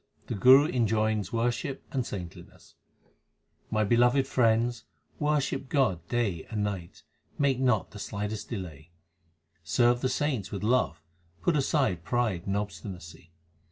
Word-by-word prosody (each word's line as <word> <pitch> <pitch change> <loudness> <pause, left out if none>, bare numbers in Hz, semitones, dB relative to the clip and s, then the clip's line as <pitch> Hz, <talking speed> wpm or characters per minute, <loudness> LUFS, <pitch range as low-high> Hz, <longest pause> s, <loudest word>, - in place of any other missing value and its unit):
The - - -4
Guru 130 +7 +7
enjoins 110 - 0
worship 120 +3 -1
and 130 -2 0
saintliness: 90 -7 -9 1.0
My 110 0 +1
beloved 120 +5 +3
friends, 120 -2 +1 0.3
worship 145 -3 0
God 95 - +1
day 105 -9 -1
and 105 -2 -2
night; 95 -4 -5 0.3
make 140 -3 +2
not 125 -6 +1
the 105 - -10
slightest 105 +1 -4
delay. 85 - -7 0.7
Serve 120 +8 +2
the 130 - +1
saints 130 -6 -1
with 100 0 -5
love; 110 -9 +1 0.4
put 175 - +2
aside 135 - +1
pride 110 -6 -1
and 100 +1 0
obstinacy. 90 -4 -7
110 Hz, 125 wpm, -28 LUFS, 95-130 Hz, 1.0 s, Guru